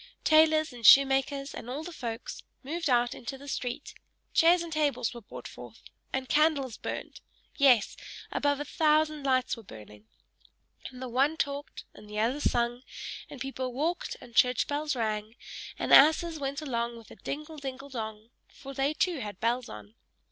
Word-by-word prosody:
Tailors, 310 -1 +4
and 240 -1 -11
shoemakers, 275 +3 +5
and 240 - -8
all 280 +5 -4
the 355 - -7
folks, 235 -6 -6 0.2
moved 320 +3 -2
out 245 -1 +3
into 270 +3 -7
the 280 +1 -12
street 250 0 -4 0.4
chairs 340 +1 +5
and 335 -1 -6
tables 290 -6 0
were 235 - -9
brought 205 - -9
forth - - -12 0.3
and 265 -1 -2
candles 290 -6 +2
burnt - - -6 0.3
yes, 255 -7 +4 0.4
above 285 -1 +1
a 290 - -3
thousand 305 0 +2
lights 255 -2 +1
were 230 - -11
burning 105 - -13 0.8
and 255 0 -10
the - - -4
one 270 +6 +1
talked 285 -1 -3
and 210 - -14
the 210 - -6
other 235 +6 +1
sung; 240 -3 0 0.5
and 285 - -9
people 260 -1 -4
walked 340 - -2
and 235 - -14
church 250 0 +4
bells 295 0 -2
rang, 215 -1 -2 0.4
and - - 0
asses 315 +3 +6
went 275 +2 -3
along 235 -4 -2
with 230 - -14
a - - -11
dingle 305 +2 -6
dingle 270 0 -7
dong! 220 -3 -6 0.2
for 275 -1 -11
they 275 +3 0
too 345 -1 0
had 205 -5 -6
bells 240 +2 0
on. 105 0 -10
270 Hz, 170 wpm, -29 LUFS, 235-300 Hz, 0.8 s, asses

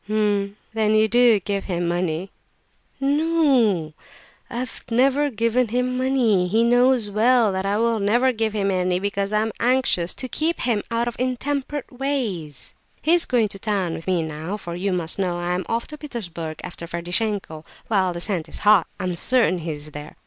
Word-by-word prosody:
"H'm, 205 -2 0 0.2
then 215 -1 +2
you 215 0 +4
do 240 -1 +5
give 200 +1 -3
him 175 -2 -2
money?" 175 +1 -2 0.7
"N 275 +1 +2
no, 260 - +2 0.6
I - - -8
have 250 -1 -5
never 270 +5 +3
given 230 +1 +1
him 250 +3 -1
money, 255 -6 +2
and 180 - -1
he 225 +4 +3
knows 245 -2 +3
well 230 +1 +4
that 190 +1 -2
I 200 +1 +1
will 230 0 +1
never 240 +6 +3
give 220 -2 -1
him 200 -2 0
any; 180 -1 +1
because 200 0 -2
I 210 0 +2
am 220 0 -1
anxious 245 -8 +1
to 260 - -4
keep 320 +6 0
him 230 -4 +1
out 235 0 0
of 240 - -3
intemperate 275 +2 -2
ways. 210 - -3 0.3
He 320 - +4
is 345 -1 +4
going 230 -4 +2
to 195 - -9
town 195 -5 -1
with 165 - -7
me 180 -3 +1
now; 160 +5 -5
for 175 -4 -7
you 190 +3 -2
must 175 0 -2
know 180 -2 0
I 175 0 -2
am 180 +1 -2
off 230 +1 -1
to 300 -1 -9
Petersburg 170 - -6
after 170 -1 -7
Ferdishenko, 175 -1 -2 0.2
while 190 -4 +2
the 170 0 -5
scent 180 -5 -1
is - - -4
hot; 205 -5 +6
I'm 180 -1 -2
certain 225 0 +2
he 165 0 -5
is 150 +1 -8
there. 150 +1 -9
210 Hz, 195 wpm, -23 LUFS, 180-245 Hz, 0.7 s, hot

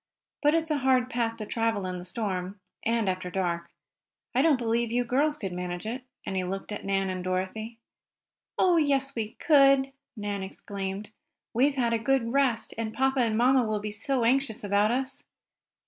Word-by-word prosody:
But 295 +1 +4
it's 325 -1 0
a 295 - +1
hard 255 -1 +2
path 230 -1 -1
to 215 - -5
travel 225 -3 0
in 180 -1 -3
the 175 - -9
storm, 190 -1 -3 0.2
and 230 -2 +1
after 185 -1 -1
dark. 175 -2 -2 0.6
I 255 - +3
don't 310 -2 +4
believe 235 -1 0
you 245 +1 +2
girls 290 +5 +1
could 195 -8 -4
manage 180 +1 -4
it," 240 +4 -3 0.2
and 190 - -3
he 185 - 0
looked 195 +3 -5
at 210 - -5
Nan 195 -1 0
and 185 -1 -4
Dorothy. 190 +5 -3 0.8
"Oh, 360 -2 +4
yes, 275 -3 +2
we 220 -3 -3
could!" 275 -3 +5 0.3
Nan 205 -1 -3
exclaimed. 195 +1 -5 0.4
"We've 270 +5 +3
had 240 -3 +1
a 230 - +1
good 245 -1 +1
rest, 265 -5 +2
and 220 -1 -3
papa 265 0 +2
and 225 -3 +2
mamma 255 +2 +4
will 215 -2 -1
be 210 0 -4
so 240 +4 -1
anxious 250 -2 +1
about 205 +1 +3
us!" 260 +3 -2
230 Hz, 185 wpm, -28 LUFS, 195-265 Hz, 0.8 s, could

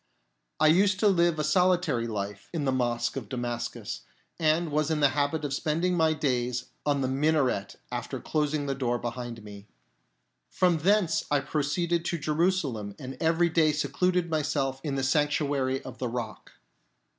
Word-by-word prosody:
I - - +4
used 190 +5 +4
to 215 - +5
live 170 -4 +3
a 150 - 0
solitaryjlife 125 - 0
in 150 -3 -1
the 135 - +2
Mosque 120 -2 0
of 115 -7 -6
Damascus, 120 -1 -4 0.4
and 160 0 +2
was 150 +1 +1
in 155 -1 0
the 145 -2 +5
habit 145 +2 0
of 140 - -2
spending 165 +6 0
my 160 -2 +3
days 125 -4 -1 0.2
on 140 -1 +2
the 130 - +1
minaret 135 -6 +1 0.2
after - - -4
closing 150 -1 -1
the 140 - -1
door 125 -2 -1
behind 120 -1 -5
me. 100 -1 -11 0.8
From 175 -3 +2
thence 175 -2 +2
I 145 - +3
proceeded 160 +4 -1
to 170 - -1
Jerusalem, 150 - 0
and 130 -1 -7
every 165 +1 +3
day 160 -1 +3
secluded 170 +5 0
myself 140 -4 -1
in 145 -3 -2
the 135 - -1
Sanctuary 140 -1 +1
of 125 -2 -9
the 125 - -1
Rock. 115 -3 -6
145 Hz, 160 wpm, -28 LUFS, 125-160 Hz, 0.8 s, to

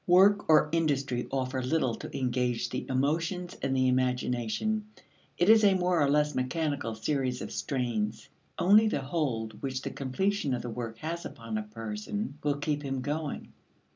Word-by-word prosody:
Work 195 +3 +5
or 155 -1 +6
industry 140 -6 0
offers 130 -1 -2
little 155 -7 +2
to - - -7
engage 125 -2 0
the 130 - -4
emotions 165 +7 0
and 135 -1 0
the 130 0 +3
imagination; 125 - 0 0.5
it 175 - +2
is 220 0 +7
a 200 -2 +6
more 180 -2 +2
or 140 - +3
less 150 +1 +2
mechanical 135 -3 -1
series 130 +1 -1
of - - -6
strains. 120 -6 -2 0.3
Only 210 +4 +6
the 180 - 0
hold 130 -7 -2
which 130 -1 -3
the - - -3
completion 145 +2 -1
of 120 - -5
the 120 - -4
work 115 -1 -5
has 165 +6 -4
upon 115 -3 -6
a 110 - 0
person 115 - -5
will 145 -1 +1
keep 150 0 -1
him 135 -2 -3
going. 145 +2 -3
135 Hz, 170 wpm, -29 LUFS, 125-165 Hz, 0.5 s, is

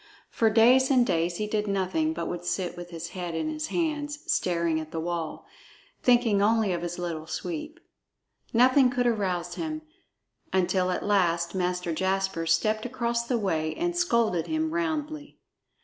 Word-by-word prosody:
For 225 - +3
days 245 +4 +5
and 255 -3 +4
days 170 -2 0
he 215 - -1
did 210 0 -1
nothing, 200 - 0
but 320 - -4
would 175 0 -4
sit 175 0 -2
with 175 0 -8
his 165 -1 -6
head 175 -3 -5
in 165 - -1
his 310 0 -3
hands, 295 -3 -2
staring 170 -2 +1
at 155 -1 -7
the 165 - -4
wall, 170 -1 -4 0.6
thinking 240 -5 +4
only 215 -2 +3
of 170 - -2
his 175 0 -4
Little 165 -3 -4
Sweep. 315 - -5 0.7
Nothing 255 +2 +5
could 245 0 0
arouse 185 -7 0
him, 310 - -4 0.7
until 185 0 +1
at 180 - -2
last 170 -4 +2
Master 180 -2 -1
Jasper 190 -1 -1
stepped 215 +5 +2
across 235 -1 -2
the 245 - +1
way 160 -7 -1
and 345 0 -1
scolded 235 - +1
him 315 0 -1
roundly. 310 -3 -3
205 Hz, 165 wpm, -27 LUFS, 175-260 Hz, 0.7 s, days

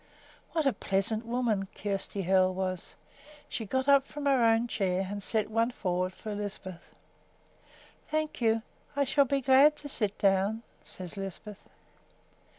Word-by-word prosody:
What 320 -3 +1
a 275 - +3
pleasant 215 +4 -1
woman 230 -5 0
Kjersti 200 -1 -3
Hoel 185 0 +3
was! 185 -1 -3 0.5
She 225 - -5
got 260 +5 -1
up 280 -1 +6
from 295 -1 -7
her 270 -4 +4
own 225 +1 +3
chair 190 -4 -1
and 205 0 -4
set 215 +1 0
one 230 +2 +2
forward 185 -6 -2
for 215 -1 -6
Lisbeth. 200 -3 -6 1.2
"Thank 310 -3 -2
you; 225 -1 +2 0.3
I 285 - +2
shall 280 +1 +3
be 275 +1 0
glad 270 +3 +6
to 295 - -6
sit 210 -7 +2
down," 200 +3 +2 0.2
said 185 0 -8
Lisbeth. 195 +1 -8
220 Hz, 150 wpm, -29 LUFS, 195-260 Hz, 1.2 s, up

